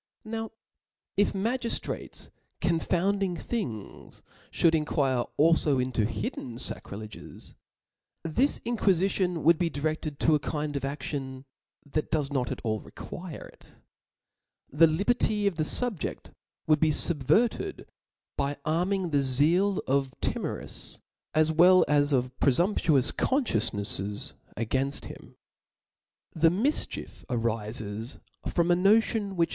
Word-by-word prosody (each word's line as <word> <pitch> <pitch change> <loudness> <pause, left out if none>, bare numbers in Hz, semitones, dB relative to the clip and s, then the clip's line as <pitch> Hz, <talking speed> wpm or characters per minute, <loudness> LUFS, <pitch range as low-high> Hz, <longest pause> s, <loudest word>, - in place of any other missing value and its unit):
Now 225 0 -4 0.7
if 205 - +2
magiftrates 230 +5 -3 0.3
confounding 180 +2 +1
things, 155 - -5 0.3
fhould 165 -1 +3
inquire 140 -5 +1
alfo 155 -2 +4
intp 125 -4 0
hiddeo 115 +2 -4
facrileges, 110 -2 -7 0.7
this 240 - +1
in 240 0 -1
quiiicion 185 -3 +1
would 165 +1 +5
be 175 - +1
direAedto 155 0 0
a 150 - +4
kind 150 0 -3
of 140 - -1
a£tion 135 -1 -5 0.4
that 150 +2 -2
docs 150 -3 0
not 130 -3 -1
at - - -5
all 110 -2 0
require 175 - -9
it; - - -17 1.0
the 165 +4 +6
liberty 205 +5 +1
of 195 -5 +1
the 155 - +1
fub 230 +3 0
je6t - - -5 0.3
would 155 -1 +4
be 160 - +3
fubvcrted 195 - +1 0.5
by 140 +1 -1
arming 175 +3 0
the 145 -1 +3
zeal 160 +9 +3
of 135 -1 0
timorous, - - -3 0.4
as 155 0 +4
well 180 +3 +6
as 145 0 +3
of 125 -1 0
prcfutnptuous 145 -2 +2
confciences 105 - 0 0.2
againft 130 +5 -1
him. - - -11 1.0
The 165 0 +4
mifchief 230 - -1
arifes 115 -1 -3 0.3
from 170 0 +1
a - - +6
notion 205 +1 +3
which 170 -2 +2
155 Hz, 120 wpm, -28 LUFS, 130-185 Hz, 1.0 s, the